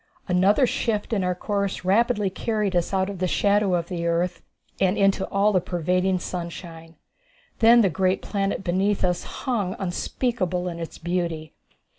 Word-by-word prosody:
Another 190 +8 +4
shift 225 -2 -1
in 200 -3 +1
our 180 0 0
course 200 0 -2
rapidly 210 0 +2
carried 210 -2 -1
us 175 -1 +1
out 190 -1 +1
of 200 -2 -6
the 185 - +1
shadow 200 0 +2
of 170 -1 -2
the 170 -2 -3
earth 170 +2 0 0.4
and 190 0 +2
into 195 -1 +3
the 190 - -2
all 205 +2 +2
pervading 180 +2 0
sunshine. 170 -2 -7 0.6
Then 235 +1 +7
the 195 - +3
great 185 +3 0
planet 195 -1 -2
beneath 190 +3 0
us 180 -1 0 0.2
hung 210 -8 -1
unspeakable 185 -1 -2
in 170 -1 -7
its 165 - -7
beauty. 170 -2 -3
185 Hz, 160 wpm, -24 LUFS, 175-205 Hz, 0.6 s, Then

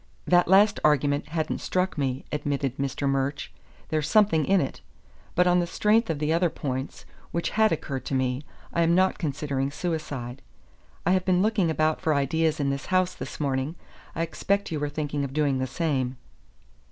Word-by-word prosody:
"That 175 0 +4
last 200 +4 +5
argument 145 -1 +2
hadn't 155 0 -2
struck 185 +1 0
me," 135 -3 -2
admitted 140 -3 -2
Mr. 140 +1 -1
Murch. 135 +1 -1 0.4
"There's 155 -1 -1
something 200 -7 +4
in 195 0 +4
it. 135 - -3 0.5
But 180 - +4
on 180 0 +4
the 175 - 0
strength 215 +5 +2
of 160 - 0
the 150 +2 0
other 170 +1 +2
points, 130 -3 -5 0.2
which 170 - -2
had 220 0 +3
occurred 135 -4 -3
to 135 - -2
me, 130 0 0 0.3
I 170 - +2
am 170 +1 +3
not 185 +1 +2
considering 140 -3 -2
suicide. 145 -6 -4 0.6
I 175 - +3
have 185 -1 +3
been 185 0 +2
looking 210 -5 +2
about 155 0 +1
for 155 -2 +1
ideas 155 +3 +1
in 140 -1 +1
this 140 0 -4
house, 185 -1 +2
this - - -8
morning. 140 +1 -1 0.4
I 165 - 0
expect 200 +4 -1
you 155 - -2
were 145 0 -1
thinking 145 -1 -2
of 135 -1 -4
doing 145 -3 +1
the 130 - -1
same." 135 -3 -1
155 Hz, 185 wpm, -26 LUFS, 140-175 Hz, 0.6 s, last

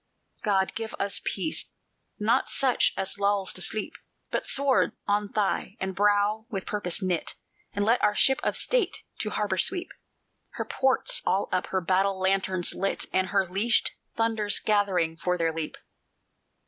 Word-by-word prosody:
"God, 195 -3 +1
give 225 -1 -5
us 200 0 -2
peace! 255 +11 -1 0.4
not 215 +3 +1
such 265 -3 +3
as 195 +1 -1
lulls 200 -1 +1
to 185 - -2
sleep, 215 - 0 0.4
But - - -2
sword 275 -1 +3
on 205 0 0
thigh, 205 0 -1
and 190 0 -3
brow 205 +2 +2
with 195 -5 -4
purpose 200 -2 -1
knit! 180 -3 -1 0.4
And 205 0 0
let 230 +3 +3
our 210 - +2
Ship 265 +6 +3
of - - +1
State 465 -7 0 0.2
to 215 - -2
harbor 205 -3 -1
sweep, 355 - +1 0.6
Her - - -4
ports 265 -1 +2
all 190 +2 0
up, 185 -1 0
her 190 - -1
battle 190 +2 +1
lanterns 190 -1 +1
lit, 195 +1 -1
And 185 0 +2
her 195 -1 +1
leashed 200 +6 +1 0.2
thunders 225 -2 +1
gathering 190 -6 +1
for 180 +2 -1
their 165 -1 0
leap!" 160 -1 -4
200 Hz, 160 wpm, -27 LUFS, 190-215 Hz, 0.6 s, such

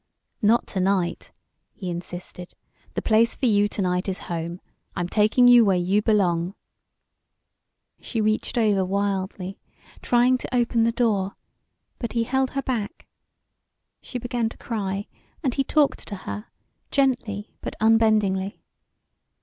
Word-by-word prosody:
"Not 225 +2 +3
to 190 - -2
night," 185 -2 0 0.4
he 190 - -7
insisted; 175 +1 -7 0.4
"the - - -2
place 225 +1 +3
for - - -2
you 205 -3 +4
to 205 - -3
night 180 +1 0
is 190 - -2 0.2
home. 170 +1 -4 0.4
I'm 175 -2 -1
taking 215 +6 +4
you 245 -1 +8
where 195 -3 +3
you 185 +4 +2
belong." 190 -4 +1 1.4
She 230 - -4
reached 215 +3 0
over 210 -4 +3
wildly, 190 0 -2 0.4
trying 250 +1 +3
to 255 - -4
open 235 -1 +2
the 230 - +3
door, 210 -5 0 0.6
but 235 - -4
he 230 -1 +1
held 265 +2 0
her 275 - 0
back; 235 +1 -3 1.0
she 250 - -6
began 240 -1 -1
to - - -13
cry, 200 -3 -3 0.4
and 260 -4 +1
he 275 - +1
talked 295 +1 +1
to 205 - -5
her, 205 +3 -7 0.4
gently 245 -7 0
but - - -5
unbendingly. 215 -3 +2
210 Hz, 140 wpm, -24 LUFS, 190-235 Hz, 1.4 s, you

